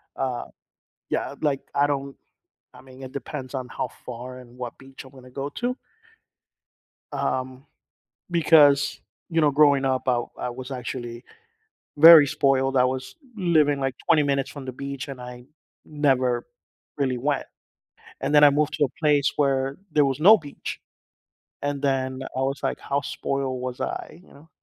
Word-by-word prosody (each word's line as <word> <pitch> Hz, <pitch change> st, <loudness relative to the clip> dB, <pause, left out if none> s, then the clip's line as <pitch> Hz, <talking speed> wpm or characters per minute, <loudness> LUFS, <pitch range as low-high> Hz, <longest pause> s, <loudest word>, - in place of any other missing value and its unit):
Uh, 130 Hz, -2 st, -3 dB, 0.7 s
yeah, -, -, -2 dB
like, 140 Hz, -3 st, +1 dB
I 145 Hz, 0 st, +3 dB
don't 140 Hz, -1 st, -3 dB, 0.6 s
I -, -, -14 dB
mean, 130 Hz, 0 st, -14 dB
it 130 Hz, -1 st, -8 dB
depends 140 Hz, -1 st, -7 dB
on 130 Hz, -2 st, -4 dB
how -, -, -4 dB, 0.2 s
far 125 Hz, +1 st, -7 dB
and 120 Hz, 0 st, -16 dB
what 120 Hz, -2 st, -6 dB
beach 135 Hz, 0 st, -12 dB
I'm 130 Hz, -, -14 dB
gonna 130 Hz, -1 st, -14 dB
go 135 Hz, +2 st, -4 dB
to. 250 Hz, +1 st, -1 dB, 1.3 s
Um, 130 Hz, +2 st, -3 dB, 0.7 s
because, 145 Hz, -4 st, +5 dB, 0.3 s
you 165 Hz, -1 st, +1 dB
know, 150 Hz, -2 st, +4 dB
growing 140 Hz, -1 st, +4 dB
up, 130 Hz, 0 st, -1 dB
I 120 Hz, -1 st, +2 dB, 0.2 s
I 125 Hz, -, -3 dB
was 130 Hz, +2 st, -8 dB
actually 120 Hz, -1 st, -6 dB, 0.7 s
very 160 Hz, -1 st, +10 dB
spoiled. 135 Hz, -1 st, +1 dB
I 125 Hz, -, +5 dB
was 130 Hz, 0 st, -2 dB, 0.2 s
living 155 Hz, -7 st, +2 dB
like 135 Hz, -1 st, -2 dB
20 150 Hz, -3 st, +5 dB
minutes 140 Hz, -1 st, 0 dB
from 140 Hz, -3 st, -9 dB
the 130 Hz, -, -4 dB
beach, 140 Hz, +1 st, -6 dB
and 135 Hz, -2 st, -8 dB
I 125 Hz, 0 st, -9 dB, 0.4 s
never 130 Hz, -5 st, +1 dB, 0.5 s
really 130 Hz, -3 st, 0 dB
went, 140 Hz, +2 st, -1 dB, 0.8 s
and 150 Hz, -, -1 dB
then 150 Hz, -, +8 dB
I 145 Hz, -, +8 dB
moved 150 Hz, +1 st, 0 dB
to 145 Hz, -, +2 dB
a -, -, 0 dB
place 145 Hz, -3 st, +3 dB
where 135 Hz, -1 st, +1 dB, 0.2 s
there 150 Hz, -1 st, +4 dB
was 135 Hz, +2 st, -1 dB
no 215 Hz, +6 st, +8 dB
beach, 145 Hz, -3 st, -8 dB, 0.8 s
and 145 Hz, -1 st, -2 dB
then 130 Hz, -1 st, -1 dB
I 130 Hz, -, 0 dB
was, 135 Hz, +1 st, -2 dB
like, -, -, -1 dB
"How 140 Hz, 0 st, -1 dB
spoiled 135 Hz, -2 st, -3 dB
was 125 Hz, -1 st, -5 dB
I," 170 Hz, -, -5 dB
you -, -, -22 dB
know. 155 Hz, +3 st, -18 dB
135 Hz, 165 wpm, -24 LUFS, 130-145 Hz, 1.3 s, very